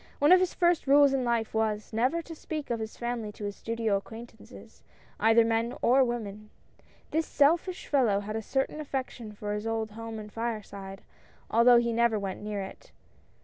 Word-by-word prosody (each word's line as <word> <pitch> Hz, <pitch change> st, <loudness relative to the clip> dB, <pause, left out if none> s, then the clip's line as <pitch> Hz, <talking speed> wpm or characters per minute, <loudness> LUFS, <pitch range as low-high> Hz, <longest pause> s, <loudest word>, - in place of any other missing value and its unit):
One 290 Hz, +3 st, +4 dB
of 370 Hz, -, +9 dB
his 370 Hz, -1 st, 0 dB
first 345 Hz, -4 st, +2 dB
rules 280 Hz, 0 st, +6 dB
in 265 Hz, -1 st, +1 dB
life 235 Hz, -2 st, -1 dB
was, 220 Hz, -1 st, -1 dB
never 255 Hz, +10 st, +1 dB
to 330 Hz, -, -9 dB
speak 310 Hz, -3 st, -6 dB
of 235 Hz, -, -1 dB
his 220 Hz, 0 st, -6 dB
family 235 Hz, -3 st, -3 dB
to 210 Hz, -, -10 dB
his 205 Hz, 0 st, -4 dB
studio 225 Hz, -3 st, -1 dB
acquaintances 225 Hz, +3 st, -12 dB, 0.2 s
— -, -, -29 dB
either 225 Hz, +1 st, +5 dB
men 230 Hz, +2 st, 0 dB
or 265 Hz, +2 st, +5 dB
women. 215 Hz, -4 st, -4 dB, 0.6 s
The 320 Hz, -, +2 dB
selfish 330 Hz, +4 st, +1 dB
fellow 235 Hz, -8 st, +2 dB
had 215 Hz, +1 st, -5 dB
a 225 Hz, -, -2 dB
certain 270 Hz, +6 st, -2 dB
affection 260 Hz, -6 st, -5 dB
for 210 Hz, 0 st, -5 dB
his 210 Hz, +2 st, -3 dB
old 225 Hz, -1 st, -2 dB
home 225 Hz, +1 st, -7 dB
and 210 Hz, -1 st, -9 dB
fireside, 205 Hz, -4 st, -5 dB, 0.5 s
although 235 Hz, +2 st, +6 dB
he 235 Hz, 0 st, +1 dB
never 235 Hz, -1 st, +2 dB
went 195 Hz, -2 st, -4 dB
near 210 Hz, -1 st, -4 dB
it. 190 Hz, -, -11 dB
230 Hz, 190 wpm, -28 LUFS, 215-265 Hz, 0.6 s, of